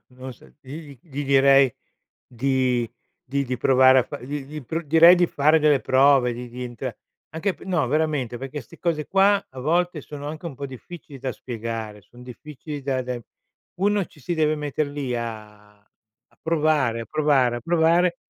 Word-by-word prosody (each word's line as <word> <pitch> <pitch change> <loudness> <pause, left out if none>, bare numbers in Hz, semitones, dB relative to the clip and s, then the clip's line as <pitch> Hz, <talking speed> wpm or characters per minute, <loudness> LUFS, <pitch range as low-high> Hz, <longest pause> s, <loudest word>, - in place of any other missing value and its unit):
non 130 0 -9
so - - -19
dirgli 145 +1 -10
gli 145 -3 -6
direi 135 -1 +5 0.6
di 125 -1 0 0.4
di 140 +2 -2
di 125 0 -3
provare 130 +1 +5
a - - +4
fa - - -8
gli 140 +2 -5
gli 150 +1 -8
pr 165 +5 -4
direi 165 +4 +7
di 175 0 +3
fare 155 +2 +3
delle 150 -3 +3
prove, 130 -2 +4
di 120 +1 -7
di 125 +1 -8
entra 120 -2 -6 0.4
anche 165 +5 -2
pe - - -15
no, 175 -7 0
veramente, 145 -5 -1
perché 135 +3 -6
ste 170 - -17
cose 160 -4 -1
qua 195 +1 +3
a 130 -1 -9
volte 170 +3 0
sono 145 +1 -9
anche 155 +2 -7
un 155 - -6
po' 140 - -7
difficili 140 +2 -11
da 130 0 -3
spiegare, 115 -3 -6
son 120 +5 -17
difficili 145 +4 -9
da 130 -1 -1
da 125 -1 -5 0.6
uno 205 -1 +2
ci 150 - -20
si 155 - -4
deve 155 -1 +2
mettere 150 0 -2
lì 140 -3 -4
a 105 -2 -8
a 110 +1 -39
provare, 150 -7 +1
a 115 - -5
provare, 140 -6 +2
a - - -6
provare 170 +4 +2
140 Hz, 185 wpm, -23 LUFS, 125-155 Hz, 0.6 s, direi